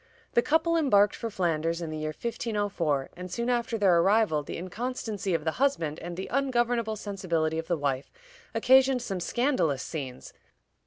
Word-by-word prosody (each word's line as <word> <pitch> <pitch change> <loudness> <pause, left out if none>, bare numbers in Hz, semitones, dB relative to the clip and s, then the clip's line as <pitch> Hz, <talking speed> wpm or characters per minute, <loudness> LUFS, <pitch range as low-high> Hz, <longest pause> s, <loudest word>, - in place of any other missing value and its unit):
The 235 - +5
couple 320 +4 +2
embarked 210 -11 +4
for 230 - -4
Flanders 165 -4 0
in 165 -2 -4
the 155 - -4
year 155 - -2
1504, 200 - -2
and 180 +1 -7
soon 235 +1 -1
after 235 -1 0
their 190 -5 +4
arrival 195 -4 +3
the 145 - -6
inconstancy 205 0 -3
of 160 - -2
the 160 - 0
husband 165 - +1
and 175 0 -7
the 190 - -3
ungovernable 240 -4 +1
sensibility 170 -6 -1
of 165 - -6
the 175 - 0
wife 140 -2 -2 0.4
occasioned 260 +2 +5
some 195 -6 -3
scandalous 180 - 0
scenes. 135 -6 -6
195 Hz, 165 wpm, -28 LUFS, 165-240 Hz, 0.4 s, The